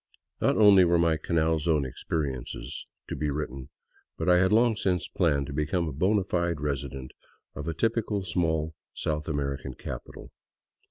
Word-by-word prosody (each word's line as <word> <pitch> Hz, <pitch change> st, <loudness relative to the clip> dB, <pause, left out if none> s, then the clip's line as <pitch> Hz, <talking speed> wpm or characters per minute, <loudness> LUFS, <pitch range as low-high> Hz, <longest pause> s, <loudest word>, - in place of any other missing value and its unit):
Not -, -, +3 dB
only 100 Hz, -3 st, +8 dB
were 85 Hz, 0 st, +4 dB
my 85 Hz, -1 st, +3 dB
Canal 80 Hz, 0 st, +1 dB
Zone 75 Hz, -2 st, +1 dB
experiences 65 Hz, -1 st, -4 dB, 0.2 s
to -, -, -4 dB
be 75 Hz, -, -1 dB
written, 70 Hz, -2 st, -4 dB, 0.5 s
but -, -, -3 dB
I 90 Hz, 0 st, +6 dB
had 95 Hz, +2 st, +3 dB
long 115 Hz, +1 st, +4 dB
since 90 Hz, -4 st, 0 dB
planned 70 Hz, -1 st, +1 dB
to 70 Hz, -, -7 dB
become 80 Hz, +4 st, 0 dB
a -, -, -3 dB
bona 95 Hz, +7 st, +2 dB
fide 85 Hz, -3 st, -1 dB
resident 70 Hz, -2 st, -4 dB, 0.4 s
of -, -, -6 dB
a 80 Hz, -, -2 dB
typical 110 Hz, 0 st, 0 dB
small 80 Hz, -3 st, 0 dB, 0.2 s
South 75 Hz, 0 st, -2 dB
Ameri 70 Hz, -3 st, -2 dB
can 65 Hz, -, -7 dB
capital. -, -, -8 dB
80 Hz, 165 wpm, -27 LUFS, 70-90 Hz, 0.5 s, only